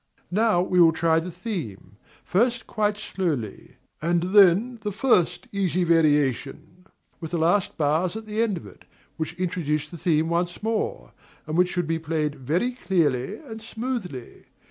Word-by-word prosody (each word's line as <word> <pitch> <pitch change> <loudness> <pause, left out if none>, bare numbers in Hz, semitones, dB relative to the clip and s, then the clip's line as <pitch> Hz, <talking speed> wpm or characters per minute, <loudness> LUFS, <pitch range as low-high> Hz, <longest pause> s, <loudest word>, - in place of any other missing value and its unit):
Now 210 -2 +3
we 180 -1 +3
will 165 -1 +6
try 160 0 +2
the 170 +3 -5
theme, 165 - -6 0.3
first 235 +4 +1
quite 210 -1 0
slowly; 160 - -4 0.3
and 170 +1 +1
then 205 +5 +5
the 210 -1 -3
first 205 -4 +2
easy 185 -3 0
variation, 155 +2 +1 0.3
with 160 - -6
the 175 - -2
last 175 +4 +1
bars 160 +5 +1
at 220 0 -6
the 215 +1 -2
end 215 -5 +1
of - - -9
it, - - -15 0.3
which 160 +1 -4
introduce 155 -4 -2
the 170 - -9
theme 160 -1 +2
once 175 +3 -2
more, 225 0 -2 0.3
and 155 - -4
which 180 +1 +3
should 175 -2 -1
be 165 +1 -1
played 155 -2 -1
very 155 - -1
clearly 170 - 0
and 225 -3 -8
smoothly. 220 - -6
175 Hz, 160 wpm, -25 LUFS, 160-205 Hz, 0.3 s, will